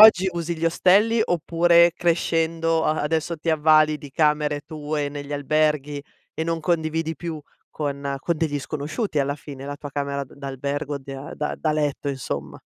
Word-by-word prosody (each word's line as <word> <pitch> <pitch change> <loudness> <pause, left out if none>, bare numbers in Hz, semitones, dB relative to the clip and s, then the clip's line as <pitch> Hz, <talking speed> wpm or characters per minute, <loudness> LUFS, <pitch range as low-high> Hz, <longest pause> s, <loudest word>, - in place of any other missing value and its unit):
oggi 190 -4 +9
usi 170 0 -3
gli 165 - -3
ostelli 200 +7 +4
oppure 170 0 +4
crescendo 165 -1 +1
a 155 - +1
adesso 160 +2 -1
ti 160 +2 -1
avvali 155 -1 +4
di 145 -3 -10
camere 150 0 +2
tue 150 -1 -3
negli 145 0 -7
alberghi 150 0 +1 0.3
e 160 - -3
non 165 0 -1
condividi 160 0 0
più 160 0 -5 0.3
con 140 -2 -3
con 170 +4 -1
degli 150 -2 0
sconosciuti 155 - -3
alla 140 +1 +1
fine, 140 -2 -9
la 145 0 -5
tua 145 -1 -8
camera 140 0 -2
d - - -17
d'albergo 140 +1 -3
di 135 0 -9
a 135 +2 -7
da 150 - -2
da 155 -1 0
letto 145 -1 -1
insomma? 70 - -4
155 Hz, 170 wpm, -24 LUFS, 145-165 Hz, 0.3 s, oggi